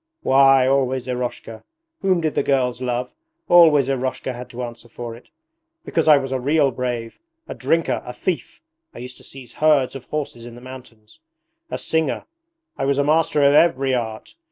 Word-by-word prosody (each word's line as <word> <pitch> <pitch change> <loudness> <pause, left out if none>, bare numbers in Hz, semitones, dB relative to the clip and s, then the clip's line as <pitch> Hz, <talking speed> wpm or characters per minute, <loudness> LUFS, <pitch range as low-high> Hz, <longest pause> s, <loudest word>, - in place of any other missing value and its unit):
Why, 135 -1 +5
always 130 -1 0
Eroshka! 125 -3 -5 0.4
Whom 185 -3 +2
did 155 -2 -1
the - - +1
girls 130 -3 0
love? 125 0 -3 0.3
Always 160 -6 +6
Eroshka 130 -1 -2
had 125 +1 -9
to 125 +1 -6
answer 120 0 -9
for 115 0 -7
it. 120 - -17 0.6
Because 165 - -1
I 150 -2 +8
was 135 -1 -3
a 130 - -1
real 145 +1 +2
brave: 120 -2 -4 0.3
a - - -5
drinker, 165 -6 0
a 125 - -7
thief 175 - -4 0.3
(I - - -10
used 125 +1 -9
to - - -16
seize 130 -3 -10
herds 145 -5 +2
of 135 - -8
horses 145 -6 -5
in 120 - -11
the - - -11
mountains), 125 -4 -13 0.5
a - - -3
singer; 160 -3 -1 0.5
I 135 - 0
was 140 0 +1
a 140 - +2
master 155 0 +2
of 140 - +5
every 140 -4 +3
art! 110 -3 -4
130 Hz, 180 wpm, -21 LUFS, 125-145 Hz, 0.6 s, I